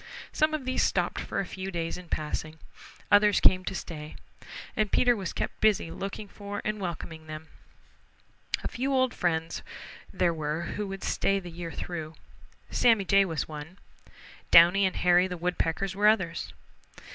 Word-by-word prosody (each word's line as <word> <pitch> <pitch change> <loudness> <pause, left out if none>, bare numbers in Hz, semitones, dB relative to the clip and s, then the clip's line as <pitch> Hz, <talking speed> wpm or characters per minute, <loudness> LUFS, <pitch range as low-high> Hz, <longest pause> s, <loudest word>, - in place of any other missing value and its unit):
Some 310 0 +2
of 285 -4 -5
these 260 0 0
stopped - - +1
for - - -3
a 195 - -1
few 190 +1 -6
days 165 -2 -3
in 180 -1 -10
passing. 155 +1 -3 0.5
Others 205 0 +6
came 185 0 +5
to 190 - -3
stay, 155 -5 -7 0.6
and 215 -2 0
Peter 245 -1 +4
was 190 -5 -4
kept - - -4
busy 210 -6 +3
looking 200 +2 -5
for 205 0 -7
and 215 0 -1
welcoming 160 -3 -6
them. 155 +1 -8 1.1
A - - -1
few 265 +3 -2
old 260 -2 +2
friends 165 -2 -1 0.5
there 175 -2 +1
were 155 +1 -2
who 210 -1 -3
would 195 0 -6
stay 195 0 +1
the 180 -2 -9
year 165 0 -6
through. 160 -3 -6 0.6
Sammy 225 -5 +4
Jay 195 +1 +5
was 160 -6 -2
one. 155 +4 -8 0.7
Downy 180 +4 +7
and 185 - -4
Hairy 180 +1 +4
the 180 -1 -5
Woodpeckers 180 +2 -1
were 205 +1 +3
others. 190 -6 +1
185 Hz, 165 wpm, -28 LUFS, 165-205 Hz, 1.1 s, Downy